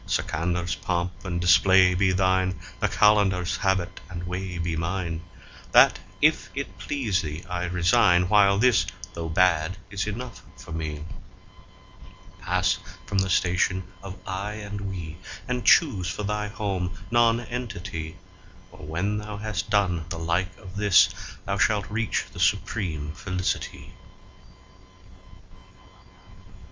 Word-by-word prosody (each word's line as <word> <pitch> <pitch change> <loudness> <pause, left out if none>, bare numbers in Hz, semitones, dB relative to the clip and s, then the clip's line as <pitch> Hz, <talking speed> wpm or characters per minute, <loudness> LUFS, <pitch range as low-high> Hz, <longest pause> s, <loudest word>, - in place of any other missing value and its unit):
Sikandar's3 85 +1 -1
pomp 90 +2 -2
and 85 -2 -2
display 90 +1 +5
be 95 +1 +2
thine, 95 0 +1 0.2
the - - +2
Qalandar's4 100 -4 +3
habit 95 -2 0
and 85 -1 -6
way 90 0 -4
be 85 -1 -2
mine; 85 0 -2 0.5
That, - - +7 0.2
if - - +3
it - - -5
please 115 -10 -1
thee, 75 0 -6
I 90 0 -2
resign, 90 0 +3
while 100 0 +5
this, 120 +1 +4 0.3
though 85 -1 -4
bad, 90 +1 +2
is 100 +1 -2
enough 115 +1 -6 0.2
for - - -12
me. 75 -2 -4 1.4
Pass 95 +1 +1 0.3
from 100 - 0
the 95 0 0
station 90 +1 +1 0.2
of 95 -1 -8
"I" 100 +2 -3
and 105 -1 -6
"We," 85 -4 -6 0.3
and 125 -1 -2
choose 100 - +4
for 95 +3 -4
thy 105 +1 -2
home 95 -3 -3
Nonentity, 115 -8 -1 0.5
For - - -15
when 90 +8 -2
thou 105 0 -6
has 105 -1 -2
done 95 -6 0
the 85 - -4
like 85 +3 -1
of 95 +1 -11
this, 100 -3 +6 0.4
thou - - -2
shalt 105 -2 +1
reach 110 0 -1
the 95 - -9
supreme 90 -5 0
Felicity. 90 +2 -4
95 Hz, 130 wpm, -25 LUFS, 85-105 Hz, 1.4 s, That